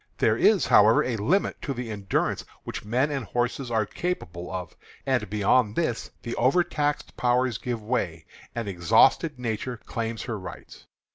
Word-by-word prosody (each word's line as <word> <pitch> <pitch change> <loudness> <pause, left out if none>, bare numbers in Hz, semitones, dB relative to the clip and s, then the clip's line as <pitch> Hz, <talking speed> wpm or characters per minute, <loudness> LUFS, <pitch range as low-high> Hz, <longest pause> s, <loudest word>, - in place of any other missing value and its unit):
"There - - +3
is, - - +4
however, - - +6
a 125 - -1
limit 155 - 0
to 140 - -3
the 120 -2 -5
endurance 100 -3 -1 0.2
which - - -6
men 125 +8 +1
and 140 -3 -2
horses 120 +3 -2
are 110 -2 +1
capable 95 - -4
of, 90 -3 -5 0.3
and, 125 -7 0
beyond 105 +2 +2
this, 125 -9 -1
the 120 - -4
overtaxed 145 +2 +1
powers 125 -2 +1
give 120 -3 -4
way, 90 -9 -2 0.3
and 115 -3 -3
exhausted 100 - +3
nature 120 0 -3
claims 115 +1 -4
her 115 -4 -4
rights. 95 - -10
120 Hz, 155 wpm, -26 LUFS, 105-130 Hz, 0.3 s, however